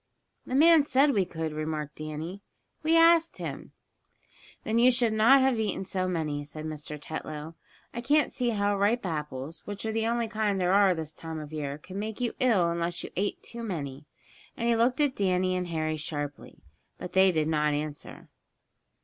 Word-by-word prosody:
"The 255 Hz, -, -2 dB
man 320 Hz, +1 st, +7 dB
said 280 Hz, +2 st, +4 dB
we 195 Hz, -5 st, +2 dB
could," 160 Hz, -3 st, -4 dB
remarked 155 Hz, -1 st, -4 dB
Danny. 155 Hz, +5 st, -6 dB, 0.4 s
"We 320 Hz, +1 st, +3 dB
asked 330 Hz, 0 st, +5 dB
him." -, -, -7 dB, 0.9 s
"Then 225 Hz, +1 st, +1 dB
you 245 Hz, +2 st, +7 dB
should 240 Hz, -3 st, +2 dB
not 235 Hz, +6 st, +6 dB
have 260 Hz, -3 st, +2 dB
eaten 205 Hz, -3 st, -2 dB
so 185 Hz, -1 st, -1 dB
many," 155 Hz, -5 st, -2 dB
said 155 Hz, +1 st, -8 dB
Mr. 150 Hz, -1 st, -6 dB
Tetlow. 155 Hz, +1 st, -6 dB, 0.4 s
"I 235 Hz, -, -4 dB
can't 290 Hz, +4 st, +2 dB
see 245 Hz, -2 st, 0 dB
how 205 Hz, -2 st, +1 dB
ripe 205 Hz, +3 st, +1 dB
apples, 150 Hz, -2 st, -5 dB
which 205 Hz, +1 st, -6 dB
are 220 Hz, -, -1 dB
the 225 Hz, 0 st, 0 dB
only 235 Hz, 0 st, 0 dB
kind 210 Hz, -2 st, -1 dB
there 180 Hz, 0 st, +2 dB
are 195 Hz, -2 st, +5 dB
this 160 Hz, -1 st, -5 dB
time 160 Hz, 0 st, -7 dB
of 150 Hz, 0 st, -9 dB
year 145 Hz, -2 st, -3 dB
could 185 Hz, +5 st, -10 dB
make 215 Hz, +1 st, -4 dB
you 245 Hz, -2 st, -1 dB
ill 205 Hz, -10 st, +3 dB
unless 170 Hz, 0 st, -2 dB
you -, -, -7 dB
ate 200 Hz, +2 st, -2 dB
too 235 Hz, 0 st, -7 dB
many," 150 Hz, -9 st, -5 dB, 0.5 s
and 235 Hz, -, -1 dB
he 235 Hz, -, +3 dB
looked 245 Hz, +4 st, +2 dB
at 290 Hz, -3 st, +2 dB
Danny 185 Hz, -1 st, +1 dB
and 180 Hz, -1 st, -2 dB
Harry 155 Hz, -2 st, -2 dB
sharply. 145 Hz, -2 st, -6 dB, 0.3 s
But 180 Hz, -, -8 dB
they 190 Hz, 0 st, +5 dB
did 155 Hz, -3 st, 0 dB
not 150 Hz, -1 st, +1 dB
answer. 150 Hz, 0 st, -6 dB
185 Hz, 190 wpm, -28 LUFS, 155-230 Hz, 0.9 s, man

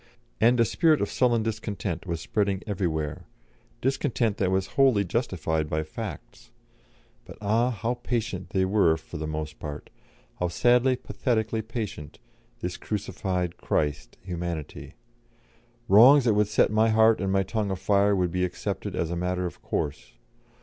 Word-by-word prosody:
And 120 Hz, +2 st, +4 dB
a 115 Hz, -, +5 dB
spirit 155 Hz, -, +3 dB
of -, -, -2 dB
sullen 120 Hz, -3 st, +2 dB
discontent 105 Hz, -5 st, -4 dB
was 85 Hz, -2 st, -2 dB
spreading 100 Hz, -3 st, -1 dB
everywhere, 80 Hz, -7 st, -3 dB, 0.5 s
discontent 125 Hz, -5 st, 0 dB
that 95 Hz, -, +1 dB
was 95 Hz, 0 st, 0 dB
wholly 130 Hz, -7 st, +4 dB
justified 80 Hz, -7 st, -1 dB
by 80 Hz, 0 st, -1 dB
facts. 80 Hz, -, -8 dB, 0.7 s
But -, -, -12 dB
ah! 110 Hz, +4 st, +2 dB
how 115 Hz, 0 st, -2 dB
patient 120 Hz, -5 st, -3 dB
they 95 Hz, -1 st, +1 dB
were 95 Hz, -5 st, +3 dB
for 80 Hz, -, -9 dB
the 80 Hz, 0 st, -4 dB
most 75 Hz, 0 st, -5 dB
part, 75 Hz, -1 st, -7 dB, 0.5 s
how 90 Hz, -, +1 dB
sadly, 125 Hz, +8 st, +3 dB
pathetically 115 Hz, -3 st, -1 dB
patient, 110 Hz, -, -6 dB, 0.4 s
this -, -, -3 dB
crucified 90 Hz, -4 st, -3 dB
Christ, 75 Hz, -2 st, -2 dB
Humanity; 85 Hz, -4 st, -5 dB, 0.9 s
wrongs 125 Hz, +7 st, +7 dB
that 115 Hz, -, +4 dB
would 105 Hz, 0 st, +2 dB
set 105 Hz, -, +2 dB
my 110 Hz, +1 st, +3 dB
heart 110 Hz, -1 st, +4 dB
and 95 Hz, 0 st, 0 dB
my 95 Hz, 0 st, +2 dB
tongue 105 Hz, +1 st, -2 dB
afire 100 Hz, +2 st, +2 dB
would 90 Hz, -2 st, 0 dB
be 90 Hz, +1 st, 0 dB
accepted 90 Hz, -1 st, -3 dB
as 85 Hz, -, -1 dB
a -, -, -1 dB
matter 90 Hz, +1 st, -1 dB
of 85 Hz, -, -7 dB
course. 75 Hz, -1 st, -4 dB
100 Hz, 150 wpm, -26 LUFS, 85-115 Hz, 0.9 s, wrongs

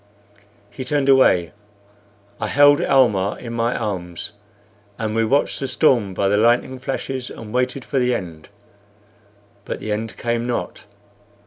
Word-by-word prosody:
He 130 Hz, -, -6 dB
turned 140 Hz, +1 st, 0 dB
away. 95 Hz, -11 st, +4 dB, 0.9 s
I 110 Hz, -, -2 dB
held 145 Hz, +3 st, +5 dB
Almah 105 Hz, -8 st, +3 dB
in 115 Hz, -1 st, -8 dB
my 115 Hz, +1 st, 0 dB
arms, 95 Hz, -2 st, -4 dB, 0.7 s
and 110 Hz, -1 st, -3 dB
we 115 Hz, 0 st, +1 dB
watched 135 Hz, +6 st, +1 dB
the 135 Hz, -, -3 dB
storm 120 Hz, -, +2 dB
by 100 Hz, -, +1 dB
the 100 Hz, +1 st, +2 dB
lightning 120 Hz, +4 st, +2 dB
flashes 130 Hz, -1 st, -4 dB
and 110 Hz, -1 st, -10 dB
waited 125 Hz, +1 st, -1 dB
for 135 Hz, -, -1 dB
the 125 Hz, -1 st, +1 dB
end. 80 Hz, -3 st, -7 dB, 1.1 s
But -, -, -5 dB
the 110 Hz, -, -5 dB
end 105 Hz, -1 st, -3 dB
came 120 Hz, 0 st, -2 dB
not. 105 Hz, -5 st, -4 dB
115 Hz, 145 wpm, -21 LUFS, 105-130 Hz, 1.1 s, held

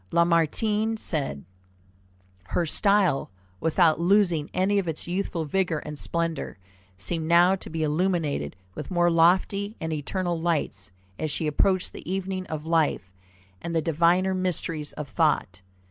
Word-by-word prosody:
Lamartine 180 Hz, +7 st, +2 dB
said: 145 Hz, -, -2 dB, 1.0 s
"Her 170 Hz, -, -1 dB
style, 200 Hz, -2 st, +2 dB, 0.3 s
without 165 Hz, -, +3 dB
losing 175 Hz, -4 st, +2 dB
any 195 Hz, +2 st, +2 dB
of 190 Hz, -, -3 dB
its 160 Hz, 0 st, -3 dB
youthful 175 Hz, -2 st, -2 dB
vigor 175 Hz, +1 st, 0 dB
and 150 Hz, 0 st, -6 dB
splendor, 165 Hz, -7 st, -3 dB, 0.4 s
seemed 160 Hz, -, -3 dB
now 175 Hz, +3 st, +5 dB
to -, -, -9 dB
be 160 Hz, 0 st, -2 dB
illuminated 155 Hz, -, 0 dB, 0.2 s
with -, -, -7 dB
more 175 Hz, -2 st, +2 dB
lofty 190 Hz, +5 st, +2 dB
and 160 Hz, 0 st, -3 dB
eternal 170 Hz, +3 st, -2 dB
lights 165 Hz, -10 st, -1 dB, 0.3 s
as 155 Hz, -, -1 dB
she 155 Hz, -, -2 dB
approached 185 Hz, +5 st, +1 dB
the -, -, -7 dB
evening 190 Hz, -1 st, -3 dB
of 155 Hz, -1 st, -5 dB
life, 160 Hz, -, +1 dB, 0.5 s
and 170 Hz, 0 st, -4 dB
the -, -, +4 dB
diviner 170 Hz, +4 st, +2 dB
mysteries 170 Hz, -4 st, -2 dB
of 150 Hz, -1 st, -6 dB
thought. 135 Hz, -, 0 dB
170 Hz, 140 wpm, -26 LUFS, 155-185 Hz, 1.0 s, now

